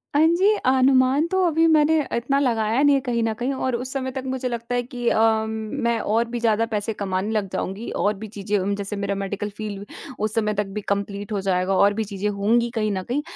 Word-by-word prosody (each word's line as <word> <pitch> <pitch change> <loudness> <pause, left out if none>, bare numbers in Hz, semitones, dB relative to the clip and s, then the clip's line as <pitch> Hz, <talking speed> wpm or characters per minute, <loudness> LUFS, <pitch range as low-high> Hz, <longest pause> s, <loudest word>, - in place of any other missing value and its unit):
हाँ 310 +2 +5
जी, 370 +5 +4
अनुमान 260 +2 +4
तो 375 +2 0
अभी 325 0 +3
मैंने 315 0 +4 0.2
इतना 270 +4 +1
लगाया 230 -1 +1
नहीं 285 -1 +5
है 270 - +1
कहीं 240 -3 -1
न 225 -1 0
कहीं 245 +5 -2
और 260 -2 -1
उस 255 +2 -4
समय 260 -1 -2
तक 265 0 -5
मुझे 260 -1 -2
लगता 235 0 -3
है 245 - +2
कि 245 -1 -5
अ, - - +1
म 220 -1 +3 0.4
मैं 235 -1 +2
और 225 +3 +1
भी 240 0 -3
ज़्यादा 225 -1 +2
पैसे 210 +1 -1
कमाने 195 0 -2
लग 210 -3 0
जाऊँगी 195 +5 -4
और 205 +1 +1
भी 220 +2 -7
चीज़ें 205 0 -2
उम, 200 +1 -1
जैसे 200 +1 -4
मेरा 200 0 -2
मेडिकल 200 +1 -3
फ़ील्ड 205 -2 -5 0.3
उस 215 0 -1
समय 210 -1 +1
तक 210 0 -1
भी 210 - -2
कंप्लीट 200 +1 -3
हो 200 -2 -1
जाएगा 190 0 0
और 200 +2 +4
भी 220 +1 -1
चीज़ें 205 0 -3
होंगी 225 +4 +1
कहीं 215 -1 0
न 185 -1 -2
कहीं। 285 +4 0
225 Hz, 240 wpm, -23 LUFS, 205-255 Hz, 0.4 s, हाँ